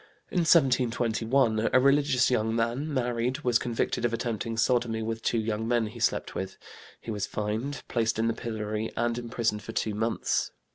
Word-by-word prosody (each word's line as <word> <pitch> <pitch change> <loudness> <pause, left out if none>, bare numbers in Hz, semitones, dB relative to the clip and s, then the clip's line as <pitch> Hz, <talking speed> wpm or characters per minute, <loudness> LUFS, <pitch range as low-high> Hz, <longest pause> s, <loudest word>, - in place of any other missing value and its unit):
In 180 - +1
1721 125 -6 +3
a 130 - +6
religious 140 -2 +3
young 110 -2 +1
man, 120 +7 -1
married, 125 +1 -1
was 120 -4 +2
convicted 120 0 -1
of 120 - +2
attempting 115 -1 -3
sodomy 115 -2 +1
with 115 0 -3
two 115 - 0
young 110 0 -1
men 120 -1 +2
he 105 - -8
slept - - 0
with; 95 0 -5 0.4
he 115 - -6
was 105 -2 -2
fined, 110 +7 -3
placed 115 -2 0
in 115 +1 +1
the 115 - +1
pillory 110 -2 -3
and 120 0 0
imprisoned 115 -3 -1
for - - -8
two 110 - -1
months. 110 +2 0
115 Hz, 175 wpm, -28 LUFS, 110-125 Hz, 0.4 s, a